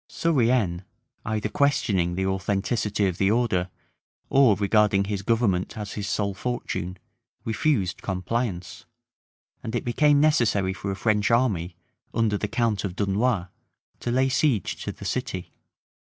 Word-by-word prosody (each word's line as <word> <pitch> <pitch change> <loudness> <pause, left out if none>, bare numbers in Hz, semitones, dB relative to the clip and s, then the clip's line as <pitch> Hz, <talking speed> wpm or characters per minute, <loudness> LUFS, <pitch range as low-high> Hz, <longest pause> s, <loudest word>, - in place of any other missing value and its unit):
Surienne, 120 - +1 0.5
either 110 -1 -1
questioning 105 -9 +1
the 95 +1 -1
authenticity 100 +2 0
of 90 -3 -2
the 95 - +3
order, 105 -6 +1 0.6
or 135 -6 +6
regarding 105 0 +3
his 100 0 -3
government 105 -3 0
as 105 -1 -5
his 100 -1 -4
sole 100 -1 0
fortune, 95 -4 -4 0.5
refused 110 - 0
compliance; 95 0 -3 0.8
and 115 - -5
it 120 - -2
became 145 +4 +3
necessary 115 -11 +2
for 100 +1 -5
a 95 - -2
French 105 -1 +1
army, 100 -8 +1 0.4
under 110 -2 +2
the 105 - -2
count 110 -3 0
of 95 -3 -4
Dunois, 100 -1 0 0.5
to - - -4
lay 130 +2 +2
siege 130 - 0
to - - -3
the - - -11
city. - - -3
105 Hz, 135 wpm, -25 LUFS, 95-120 Hz, 0.8 s, or